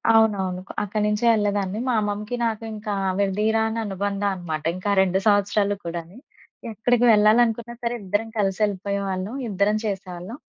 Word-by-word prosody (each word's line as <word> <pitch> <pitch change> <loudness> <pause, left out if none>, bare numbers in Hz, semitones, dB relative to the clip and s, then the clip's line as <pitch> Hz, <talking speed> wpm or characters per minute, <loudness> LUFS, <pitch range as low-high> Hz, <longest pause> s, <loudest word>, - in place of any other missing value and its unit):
అవునవును. 195 -5 +2 0.2
అక్కడి 210 +1 -2
నుంచే 210 +2 0
యెళ్ళేదాన్ని. 205 -2 0
మా - - +2
అమ్మమ్మకి, 210 +3 -3
నాకింకా 220 -2 -3 0.2
విడదీయరాని 220 +3 +1
అనుబంధమన్నమాట. 195 -5 -2
ఇంకా 205 +2 -2
2 190 0 +2
సంవత్సరాలు 205 0 +2
కూడాని. 170 +3 -6 0.6
ఎక్కడికి 240 +3 +2
వెళ్ళాలనుకున్నా 230 +2 +3
సరే! 235 0 0
ఇద్దరం 205 +4 -1
కలిసెళ్ళిపోయేవాళ్ళం. 200 0 -1
ఇద్దరం 200 +2 +1
చేసేవాళ్ళం. 190 +1 -5
205 Hz, 115 wpm, -23 LUFS, 190-220 Hz, 0.6 s, వెళ్ళాలనుకున్నా